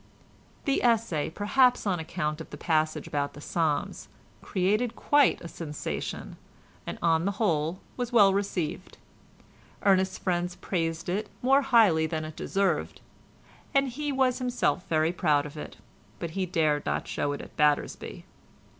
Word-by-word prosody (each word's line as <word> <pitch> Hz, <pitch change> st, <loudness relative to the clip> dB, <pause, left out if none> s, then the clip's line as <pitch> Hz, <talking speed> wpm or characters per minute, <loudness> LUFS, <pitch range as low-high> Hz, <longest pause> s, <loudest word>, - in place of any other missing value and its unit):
The 275 Hz, -2 st, +1 dB
essay, 230 Hz, -10 st, +1 dB
perhaps 245 Hz, +8 st, +3 dB
on 185 Hz, -4 st, 0 dB
account 160 Hz, -1 st, -3 dB
of -, -, -9 dB
the -, -, -8 dB
passage 155 Hz, -1 st, 0 dB
about 145 Hz, -1 st, -2 dB
the 145 Hz, -, -11 dB
Psalms, 155 Hz, 0 st, -1 dB, 0.3 s
created 210 Hz, +6 st, 0 dB
quite 290 Hz, -1 st, +3 dB
a 170 Hz, -, -7 dB
sensation, 155 Hz, -3 st, -5 dB, 0.5 s
and -, -, -4 dB
on 165 Hz, 0 st, +3 dB
the 200 Hz, -, 0 dB
whole 170 Hz, -4 st, 0 dB, 0.2 s
was 245 Hz, -1 st, -3 dB
well 205 Hz, -5 st, +6 dB
received. 190 Hz, -3 st, -3 dB, 0.9 s
Ernest's 190 Hz, -1 st, +3 dB
friends 175 Hz, -1 st, -1 dB
praised 165 Hz, -3 st, -2 dB
it 205 Hz, +4 st, -2 dB
more 270 Hz, +2 st, +5 dB
highly 220 Hz, -, +4 dB
than 155 Hz, -1 st, -3 dB
it 155 Hz, 0 st, -8 dB
deserved, 195 Hz, +2 st, -1 dB, 0.8 s
and 275 Hz, -1 st, +4 dB
he 290 Hz, +4 st, -3 dB
was 265 Hz, -2 st, +2 dB
himself 245 Hz, -7 st, 0 dB
very 155 Hz, 0 st, +2 dB
proud 150 Hz, -4 st, +2 dB
of 145 Hz, -, -9 dB
it, 75 Hz, -, -8 dB, 0.4 s
but 170 Hz, -, -5 dB
he 185 Hz, +2 st, -2 dB
dared 155 Hz, -4 st, +1 dB
not -, -, -1 dB
show 145 Hz, -, -1 dB
it 145 Hz, -, -5 dB
at -, -, -13 dB
Battersby. 150 Hz, -1 st, 0 dB
180 Hz, 150 wpm, -28 LUFS, 160-220 Hz, 0.9 s, well